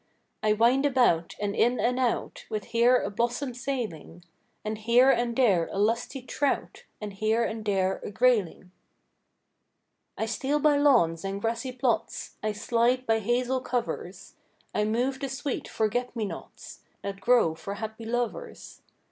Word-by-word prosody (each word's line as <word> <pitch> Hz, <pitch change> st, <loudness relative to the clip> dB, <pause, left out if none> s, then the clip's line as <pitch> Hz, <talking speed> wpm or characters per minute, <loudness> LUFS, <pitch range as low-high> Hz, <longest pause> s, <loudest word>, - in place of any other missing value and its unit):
I 215 Hz, 0 st, +3 dB
wind 235 Hz, +5 st, +3 dB
about, 245 Hz, -, +2 dB
and 205 Hz, 0 st, -2 dB
in 245 Hz, +2 st, +2 dB
and 250 Hz, +2 st, +1 dB
out, 250 Hz, -2 st, -1 dB
With 215 Hz, -2 st, -3 dB
here 240 Hz, +4 st, +4 dB
a -, -, -2 dB
blossom 240 Hz, +5 st, -1 dB
sailing, 235 Hz, -, -5 dB, 0.4 s
And 215 Hz, 0 st, -3 dB
here 240 Hz, +4 st, +5 dB
and 240 Hz, -2 st, 0 dB
there 200 Hz, -10 st, +3 dB
a -, -, -5 dB
lusty 230 Hz, +5 st, 0 dB
trout, 275 Hz, +2 st, -2 dB
And 210 Hz, -2 st, -6 dB
here 220 Hz, +3 st, +1 dB
and 220 Hz, -1 st, -3 dB
there 190 Hz, -2 st, 0 dB
a -, -, -5 dB
grayling. 205 Hz, -5 st, +1 dB, 1.5 s
I 220 Hz, -, -1 dB
steal 265 Hz, +6 st, -1 dB
by 295 Hz, -1 st, +4 dB
lawns 230 Hz, -, +3 dB
and 195 Hz, 0 st, -3 dB
grassy 230 Hz, +4 st, -2 dB
plots, 250 Hz, -1 st, -2 dB
I 215 Hz, -, 0 dB
slide 240 Hz, +4 st, +1 dB
by 225 Hz, -1 st, +2 dB
hazel 245 Hz, +4 st, 0 dB
covers; 245 Hz, -2 st, -4 dB, 0.4 s
I 210 Hz, -, +1 dB
move 250 Hz, +5 st, 0 dB
the 275 Hz, -1 st, -3 dB
sweet 270 Hz, +1 st, -3 dB
forget 240 Hz, +3 st, -1 dB
me 225 Hz, -2 st, -1 dB
nots, -, -, -9 dB, 0.2 s
That 195 Hz, -1 st, -5 dB
grow 215 Hz, -6 st, +4 dB
for 200 Hz, +5 st, -6 dB
happy 220 Hz, +1 st, -6 dB
lovers. 245 Hz, -, -4 dB
235 Hz, 155 wpm, -27 LUFS, 210-250 Hz, 1.5 s, here